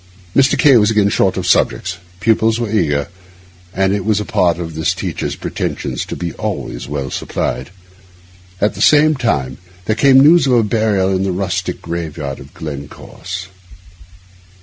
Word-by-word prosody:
Mr. 135 Hz, -1 st, +4 dB
K— 140 Hz, -5 st, +6 dB
was 105 Hz, -1 st, +3 dB
again 105 Hz, -2 st, +3 dB
short 95 Hz, -1 st, +1 dB
of -, -, -2 dB
subjects; 90 Hz, -1 st, +1 dB, 0.2 s
pupils 110 Hz, +1 st, +2 dB
were 115 Hz, -3 st, -2 dB
eager, 75 Hz, -9 st, +1 dB, 0.6 s
and 95 Hz, +1 st, +1 dB
it 100 Hz, -2 st, -1 dB
was 105 Hz, -1 st, +1 dB
a 105 Hz, -, -3 dB
part 85 Hz, -2 st, +1 dB
of 85 Hz, -2 st, -6 dB
this 80 Hz, 0 st, -1 dB
teacher's -, -, -4 dB
pretensions -, -, -4 dB
to -, -, -5 dB
be 85 Hz, -2 st, -4 dB
always -, -, -5 dB
well 70 Hz, -2 st, -4 dB
supplied. -, -, -3 dB, 0.9 s
At 105 Hz, +1 st, +1 dB
the -, -, -7 dB
same 155 Hz, +1 st, +5 dB
time 70 Hz, -, -1 dB, 0.3 s
there 110 Hz, -, 0 dB
came 135 Hz, +3 st, +5 dB
the 135 Hz, -, +7 dB
news 160 Hz, 0 st, +6 dB
of 130 Hz, -, +2 dB
a 120 Hz, -2 st, +4 dB
burial 105 Hz, -3 st, +1 dB
in 95 Hz, -, 0 dB
the 95 Hz, 0 st, 0 dB
rustic 95 Hz, +1 st, -3 dB
graveyard 80 Hz, -5 st, -5 dB
of 70 Hz, +2 st, -13 dB
Glencorse. 80 Hz, +5 st, -7 dB
95 Hz, 170 wpm, -17 LUFS, 80-110 Hz, 0.9 s, the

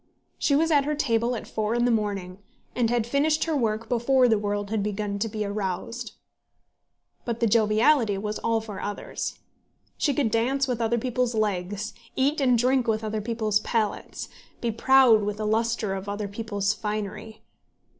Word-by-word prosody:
She 280 Hz, -, +2 dB
was 325 Hz, +3 st, +2 dB
at 285 Hz, -2 st, +4 dB
her 300 Hz, +1 st, 0 dB
table 235 Hz, -3 st, +1 dB
at 225 Hz, -, -6 dB
four 215 Hz, +1 st, -1 dB
in 240 Hz, 0 st, +2 dB
the 245 Hz, -, +3 dB
morning, 200 Hz, -4 st, -2 dB, 0.4 s
and 240 Hz, -2 st, +2 dB
had 240 Hz, -2 st, +1 dB
finished 290 Hz, +5 st, +1 dB
her 325 Hz, -2 st, -1 dB
work 225 Hz, -3 st, -1 dB
before 250 Hz, +2 st, +3 dB
the 220 Hz, -3 st, +3 dB
world 205 Hz, 0 st, -2 dB
had 220 Hz, -2 st, 0 dB
begun 205 Hz, 0 st, -2 dB
to 225 Hz, +2 st, -1 dB
be 215 Hz, 0 st, -3 dB
aroused. 205 Hz, +4 st, -4 dB, 1.1 s
But 235 Hz, -1 st, -3 dB
the 235 Hz, -, +2 dB
joviality 220 Hz, +1 st, +3 dB
was 210 Hz, +1 st, -3 dB
all 230 Hz, -1 st, 0 dB
for 210 Hz, -3 st, -7 dB
others. 205 Hz, -, -4 dB, 0.6 s
She 285 Hz, -3 st, +1 dB
could 255 Hz, -7 st, +1 dB
dance 265 Hz, +4 st, +1 dB
with 245 Hz, -2 st, -2 dB
other 230 Hz, +1 st, +1 dB
people's 250 Hz, 0 st, -1 dB
legs, 205 Hz, -1 st, -1 dB, 0.2 s
eat 285 Hz, +3 st, +1 dB
and 250 Hz, -3 st, +4 dB
drink 255 Hz, +1 st, +2 dB
with 220 Hz, 0 st, 0 dB
other 215 Hz, 0 st, -2 dB
people's 215 Hz, -2 st, 0 dB
palates, 215 Hz, -1 st, -2 dB, 0.3 s
be 235 Hz, -, -1 dB
proud 245 Hz, -1 st, +5 dB
with 205 Hz, 0 st, -2 dB
the 215 Hz, -, -3 dB
lustre 220 Hz, -1 st, 0 dB
of 195 Hz, +1 st, -5 dB
other 205 Hz, 0 st, -3 dB
people's 205 Hz, -1 st, -1 dB
finery. 215 Hz, +1 st, -5 dB
225 Hz, 175 wpm, -26 LUFS, 210-245 Hz, 1.1 s, proud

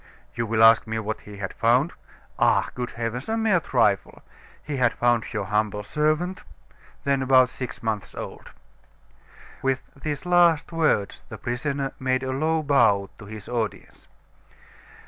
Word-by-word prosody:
You 115 Hz, -1 st, -2 dB
will 110 Hz, 0 st, +2 dB
ask 115 Hz, 0 st, +7 dB
me 110 Hz, 0 st, -2 dB
what 110 Hz, 0 st, -3 dB
he 100 Hz, -, -9 dB
had 95 Hz, -2 st, -5 dB
found? 125 Hz, +8 st, +2 dB, 0.5 s
Ah! -, -, +3 dB
good 125 Hz, 0 st, -4 dB
heavens! 115 Hz, -, -4 dB
A 225 Hz, -, 0 dB
mere 220 Hz, -5 st, +3 dB
trifle. 115 Hz, -10 st, 0 dB, 0.4 s
He 150 Hz, -2 st, -4 dB
had 125 Hz, -3 st, +3 dB
found 120 Hz, -2 st, +1 dB
your 105 Hz, -3 st, -2 dB
humble 105 Hz, 0 st, -1 dB
servant, 155 Hz, -, 0 dB, 0.6 s
then 140 Hz, -1 st, +1 dB
about 130 Hz, -1 st, +5 dB
six 130 Hz, -3 st, -7 dB
months 110 Hz, -3 st, -3 dB
old." -, -, -8 dB, 1.1 s
With 130 Hz, -1 st, 0 dB
these 145 Hz, +3 st, -5 dB
last 175 Hz, -3 st, +4 dB
words, 155 Hz, -11 st, +1 dB
the -, -, -7 dB
prisoner 135 Hz, +3 st, -2 dB
made 130 Hz, 0 st, 0 dB
a 130 Hz, -, -2 dB
low 155 Hz, +4 st, 0 dB
bow 105 Hz, -9 st, +3 dB
to 105 Hz, -, -10 dB
his 105 Hz, -1 st, -9 dB
audience. 115 Hz, -3 st, -4 dB
125 Hz, 150 wpm, -24 LUFS, 110-145 Hz, 1.1 s, ask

